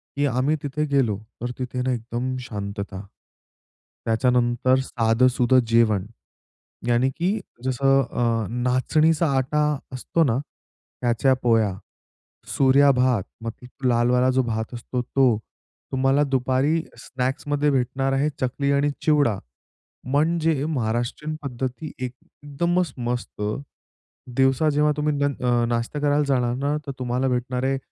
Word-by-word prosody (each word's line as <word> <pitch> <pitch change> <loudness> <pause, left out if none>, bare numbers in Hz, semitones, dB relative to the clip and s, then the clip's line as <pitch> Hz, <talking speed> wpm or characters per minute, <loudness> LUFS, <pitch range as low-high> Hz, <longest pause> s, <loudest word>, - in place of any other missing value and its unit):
की 145 - +1
आम्ही 135 +3 +1
तिथे 150 +2 -1
गेलो, 120 -8 +2 0.2
तर 120 +1 -2
तिथे 125 0 -3
ना, 130 - 0
एकदम 120 +2 -3
शांतता. 100 -2 -5 1.0
त्याच्यानंतर 125 +2 +2
साधंसुधं 125 +1 +3
जेवण, 110 -4 +3 0.8
याने, 120 +2 +3
की 190 +9 -1 0.2
जसं 135 +1 +3
अ, 115 -4 -1
नाचणीचा 130 +7 +2
आटा 140 +3 +1 0.3
असतो 130 +6 0
ना, 120 -3 +1 0.6
त्याच्या 125 +2 +2
पोळया, 110 -5 +3 0.8
सूर्या 140 +1 +5
भात 125 -4 +2 0.2
मतलब 125 +3 -7
लालवाला 125 +1 +3
जो 130 0 +2
भात 110 0 -3
असतो 120 +1 -4
तो, 125 -2 +2 0.6
तुम्हाला 135 +2 +3
दुपारी 135 +4 +1 0.2
स्नॅक्समध्ये 145 +3 -1
भेटणार 135 +1 0
आहे 135 +2 +2
चकली 140 +2 0
आणि 140 +1 +2
चिवडा 145 -10 +3 0.7
म्हणजे 155 +2 +1
महाराष्ट्रीयन 125 +2 -2
पद्धती, 130 +3 -4
एकदमच 145 +6 -3
मस्त. 120 -3 -4 0.9
दिवसा 135 +3 +3
जेव्हा 150 +1 +3
तुम्ही 150 0 0
नं 125 -4 +1
नाश्ता 120 +5 -2
करायला 145 0 +2
जाणार 125 -3 +1
ना, 140 +3 0
तर 140 - -3
तुम्हाला 125 +1 -1
भेटणार 125 0 -1
आहे 135 0 +1
130 Hz, 120 wpm, -23 LUFS, 120-140 Hz, 1.0 s, सूर्या